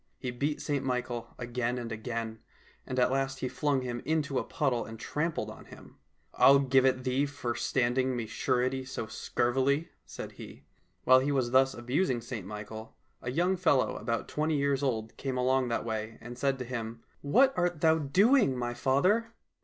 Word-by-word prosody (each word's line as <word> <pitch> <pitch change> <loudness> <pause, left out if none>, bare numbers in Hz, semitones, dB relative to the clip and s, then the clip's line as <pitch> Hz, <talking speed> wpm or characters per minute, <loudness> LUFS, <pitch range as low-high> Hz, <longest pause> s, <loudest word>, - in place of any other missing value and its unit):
He 125 - -4
beat 145 +5 -2
St 145 -2 -1
Michael 125 -2 -3
again 120 0 -2
and 120 -1 -5
again, 110 0 -4 0.5
and 130 - -4
at 125 0 +3
last 135 0 -1
he 130 - 0
flung 135 +2 0
him 120 -1 -4
into 145 -3 0
a - - -2
puddle 130 -5 0
and 110 0 -9
trampled 160 +6 -2
on - - -12
him. - - -15 0.2
" - - -42
I'll 140 - +7
give 135 -1 +4
it 130 -1 +1
thee 130 +3 +1
for 140 -4 -3
standing 125 +2 +1
me 120 -2 -2
surety 130 +4 0
so 130 -3 -5
scurvily," 135 +7 0 0.2
said - - -7
he. - - -11 0.4
While 130 0 +7
he 135 +2 0
was 130 -4 0
thus 135 +1 +4
abusing 125 +3 0
St 115 -5 -6
Michael, 105 +2 -8 0.3
a 125 - -4
young 175 +8 +1
fellow 145 -7 +2
about 115 -1 -2
twenty 155 0 0
years 140 -1 +1
old 115 -5 -2
came 135 -2 -3
along 130 0 +2
that 115 -1 -1
way, 110 0 -4
and 120 +1 -9
said 135 +1 0
to 125 - -5
him, 115 -2 -5
" - - -37
What 260 - +4
art 175 -3 0
thou 160 0 +4
doing, 190 - +4
my 120 -1 -2
father 200 - +1
130 Hz, 190 wpm, -30 LUFS, 120-140 Hz, 0.5 s, I'll